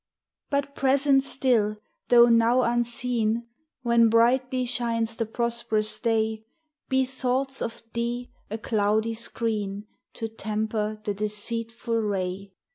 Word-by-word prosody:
But, 280 -1 -1
present 275 0 +4
still, 235 -6 +1 0.3
though 240 -1 +7
now 235 +2 +4
unseen! 235 -1 0 0.4
When 235 -1 +4
brightly 250 +3 +3
shines 230 -2 -1
the 225 -1 -2
prosperous 225 -2 -1
day, 220 -2 0 0.5
Be 265 0 +2
thoughts 265 +1 -2
of 230 - -4
Thee 240 +1 -3 0.2
a 215 - -3
cloudy 215 +1 0
screen 215 -3 -2 0.3
To 225 - -3
temper 215 0 -3
the 205 - -1
deceitful 230 +3 -1
ray. 195 -1 -3
230 Hz, 115 wpm, -26 LUFS, 215-245 Hz, 0.5 s, though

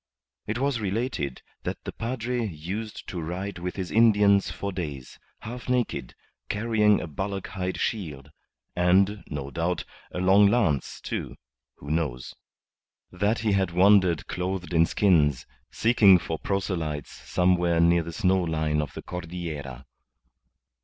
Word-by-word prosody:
It 110 - -2
was 135 -1 0
related 100 - -2 0.2
that - - -5
the - - -5
padre 120 +1 -3
used 100 +4 -5
to 90 - -4
ride 90 +4 -4
with 90 +1 -4
his 95 -3 -4
Indians 105 -3 +5
for 100 - -4
days, 75 -9 -6 0.2
half 120 +3 -7
naked, 125 -1 -1 0.3
carrying 105 -1 +3
a - - -4
bullock 95 +5 -4
hide 95 -2 -3
shield, 80 - -3 0.4
and, 95 +4 +3
no 70 -2 -5
doubt, 85 +3 -1 0.3
a - - -7
long 95 +3 +5
lance, 100 - +1
too - - -4 0.4
who 70 - -8
knows? 70 -7 -2 0.8
That 105 +3 +1
he 105 - +3
had 95 -2 +2
wandered 90 -2 +4
clothed 90 -2 -3
in 85 0 +4
skins, 75 -10 +3 0.2
seeking 110 -5 +5
for 80 -2 -4
proselytes 85 -7 -2
somewhere 90 -2 +1
near 85 +1 +4
the 85 +1 -6
snow 95 0 +2
line 80 -3 0
of 75 -2 -5
the - - -7
Cordillera. 80 -7 -6
90 Hz, 140 wpm, -26 LUFS, 80-105 Hz, 0.8 s, Indians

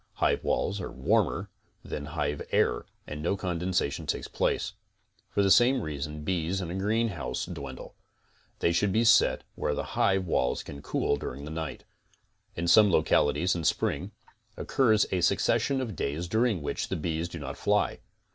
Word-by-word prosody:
Hive - - +1
walls 100 0 0
are 85 - -5
warmer - - 0 0.3
than 75 - -5
hive 75 -1 -1
air - - +1 0.2
and 75 0 -6
no 85 +5 0
condensation 90 -5 -1
takes - - -2
place. - - -1 0.6
For 100 - +1
the 95 - +3
same 125 +2 +5
reason 75 0 -5
bees 90 +1 -1
in 85 -3 -4
a - - -4
greenhouse 100 - -1
dwindle. - - -8 0.7
They 85 - +3
should 95 +4 +2
be 110 +4 +2
set 115 - +5
where 75 - -1
the - - -2
hive 95 -1 +2
walls 65 -7 0
can 70 0 -9
cool 70 - 0
during 70 0 -6
the 75 - -7
night. 80 -1 -5 0.7
In 85 +1 -2
some 105 +4 +7
loclaities 80 0 +3
in 85 - -3
spring, - - 0 0.5
occurs 110 -5 +3
a 90 - +1
succession 135 +9 +2
of 115 -7 -4
days 75 +4 -2
dur 110 +7 +2
ing 95 -10 -2
which - - -2
the - - -2
bees 80 +1 -2
do 85 - -7
not 70 -4 -6
fly. - - +1
85 Hz, 170 wpm, -28 LUFS, 75-100 Hz, 0.7 s, some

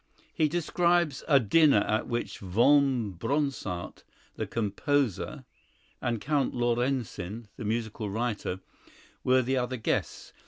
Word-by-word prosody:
He 155 - +2
describes 170 -2 +1
a 140 -4 +6
dinner 135 0 +5
at 110 +2 0
which 120 0 -3
Von 120 +3 +3
Bronsart, 115 - -3 0.3
the - - -3
composer, 115 - -1 0.6
and 120 -2 -1
Count 145 +3 0
Laurencin, 120 -3 -1
the 115 - -7
musical 110 -1 -2
writer, 105 -4 -2 0.6
were 130 0 +4
the 130 +2 0
other 125 0 -1
guests. 110 - -2
120 Hz, 115 wpm, -28 LUFS, 110-140 Hz, 0.6 s, a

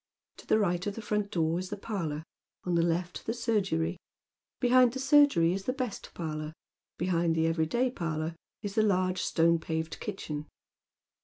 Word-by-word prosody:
To - - -14
the - - +4
right 180 -3 0
of 205 - -2
the 225 - -5
front 210 -1 -1
door 165 -1 +1
is 185 0 -5
the 205 - -4
parlour, 165 -8 -3 0.4
on 180 - -1
the 170 - +4
left 170 +1 -1
the 225 - -1
surgery. 195 -8 0 0.6
Behind 250 -1 +5
the 265 - -4
surgery 275 - +5
is 195 0 -4
the 255 - 0
best 255 -6 -4
parlour; 155 -2 -4 0.4
behind 170 -2 +1
the 160 0 +2
every 165 -1 +1
day 245 +8 +1
parlour 160 -5 -3 0.3
is 205 -1 -3
the 220 - +3
large 185 -3 +2
stone 170 0 +3
paved 160 0 -3
kitchen. 150 -7 -5
180 Hz, 175 wpm, -30 LUFS, 165-210 Hz, 0.6 s, Behind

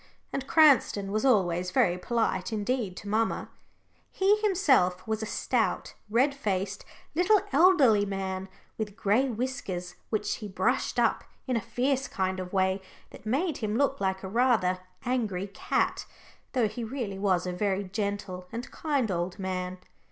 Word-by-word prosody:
And 275 0 -3
Cranston 270 -11 +4
was 215 +3 0
always 180 -8 +2
very 175 -1 +3
polite 185 -2 -1
indeed 215 -3 -1
to 205 - -8
mamma. 220 +2 0 0.6
He 395 +2 +3
himself 270 - +2
was 220 0 -1
a 220 - -3
stout, - - -1 0.2
red 255 +6 +3
faced, 200 -6 -2 0.3
little, 365 +6 +4
elderly 280 - +6
man, 190 -1 -3 0.3
with 210 -2 -3
gray 225 +5 +2
whiskers, 210 -7 -4 0.2
which 210 -1 -1
he 215 - -6
brushed 195 - 0
up - - +2 0.2
in 255 - -1
a 230 - +1
fierce 265 +5 0
kind 190 -1 -2
of 180 -1 -5
way 190 0 +1 0.3
that - - -12
made 290 +7 0
him 215 -1 -2
look 275 0 +1
like 190 0 -1
a - - -4
rather 215 -4 +2 0.3
angry 220 -7 -1
cat, 200 - -1 0.5
though 245 -5 +3
he 215 +3 -5
really 225 -5 -4
was 185 -3 +1
a 180 - -2
very 195 +1 0
gentle 200 -2 -4
and 235 +2 -6
kind 280 -9 0
old 175 +1 -2
man. 185 -1 -3
210 Hz, 155 wpm, -28 LUFS, 190-255 Hz, 0.6 s, elderly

